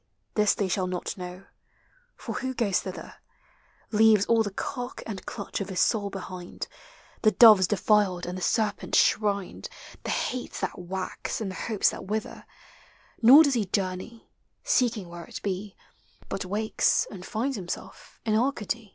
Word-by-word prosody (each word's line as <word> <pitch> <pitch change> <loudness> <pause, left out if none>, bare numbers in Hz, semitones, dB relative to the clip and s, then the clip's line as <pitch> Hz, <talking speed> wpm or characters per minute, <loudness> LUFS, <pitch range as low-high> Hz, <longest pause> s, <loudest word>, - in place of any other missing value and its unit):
this 210 -1 +3
they 200 - 0
shall 185 0 0
not 180 -1 -3
know; 180 +1 -8 0.7
For - - -6
who 260 0 -3
goes 205 -6 +1
thither, 185 - -8 0.7
Leaves 215 -2 +5
all 230 -1 +3
the 210 - -1
cark 245 +5 -5
and 200 -4 -6
clutch - - -5
of 200 - -4
his 185 -2 -2
soul 205 -1 +2
behind, 185 -2 -7 0.5
The 215 - +6
doves 215 -5 +8
defiled 205 -3 +2
and 180 - -4
the 185 - -6
serpents 210 +1 0
shrined, 200 -3 +1 0.3
The - - -4
hates 255 -1 -2
that - - -3
wax 185 +7 -4
and 205 -4 -3
the - - -8
hopes 215 -3 +3
that - - -8
wither; 215 +2 -4 0.7
Nor 265 +7 +9
does 285 -3 +2
he 230 -4 +1
journey, 190 +4 -3 0.3
seeking 230 -7 +1
where 170 0 -9
it - - -8
be, 195 +1 -3 0.5
But 195 - -3
wakes 210 +4 +1
and 185 -3 -9
finds 250 +8 -2
himself 195 - -7
in 220 - +1
Arcady. 230 -3 -1
205 Hz, 160 wpm, -27 LUFS, 185-225 Hz, 0.7 s, Nor